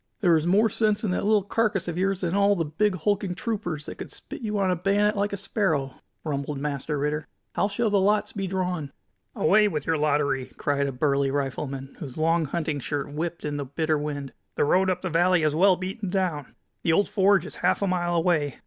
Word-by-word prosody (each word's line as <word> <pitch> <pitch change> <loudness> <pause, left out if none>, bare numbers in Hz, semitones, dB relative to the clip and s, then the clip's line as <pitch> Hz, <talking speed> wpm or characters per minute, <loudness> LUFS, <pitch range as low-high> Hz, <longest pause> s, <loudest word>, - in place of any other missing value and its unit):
"There 175 -5 +5
is 160 +1 +1
more 205 +5 +4
sense 215 -1 +1
in 205 - 0
that 180 - -1
little 210 -1 +3
carcass 210 -2 0
of 170 - -3
yours 195 +1 0
than 175 -3 -1
in - - -1
all 200 0 +4
those 165 -5 -2
big, 210 0 +2
hulking 195 +1 -1
troopers, 180 -8 -3
that - - -8
could - - -7
spit - - -9
you 210 -2 -2
on 190 -2 +2
a - - +2
bayonet 200 +4 +2
like 205 0 0
a 200 - -3
sparrow!" 165 - -1 0.3
rumbled 145 -1 -3
Master 145 +1 -3
Ritter. 150 +2 -2 0.3
"How - - +1
shall 215 +2 -1
the 205 - +4
lots 205 +2 +2
be 195 -2 -3
drawn?" 180 -6 -2 0.4
"Away 210 +6 +4
with 150 -7 -3
your 160 -2 +1
lottery!" 145 -3 +1
cried 140 -1 0
a - - -2
burly 140 +1 +1
rifleman, 135 0 -3
whose 135 -2 -7
long 165 +1 +2
hunting 155 0 -2
shirt 145 +1 -4
whipped 165 +2 -4
in 145 -1 -2
the 140 - -3
bitter 155 +3 0
wind. 145 -3 -4 0.2
"The - - +2
road 190 +5 +3
up 180 0 -1
the 185 - -1
valley 175 +1 +3
is 155 -1 +2
well 185 +3 +5
beaten 190 +3 -5
down. 180 -7 -2 0.3
The 165 - +2
old 200 +5 +3
forge 195 -1 +3
is - - -8
half - - +1
a - - +1
mile 175 -2 0
away. 160 -5 +1
175 Hz, 225 wpm, -25 LUFS, 150-200 Hz, 0.4 s, There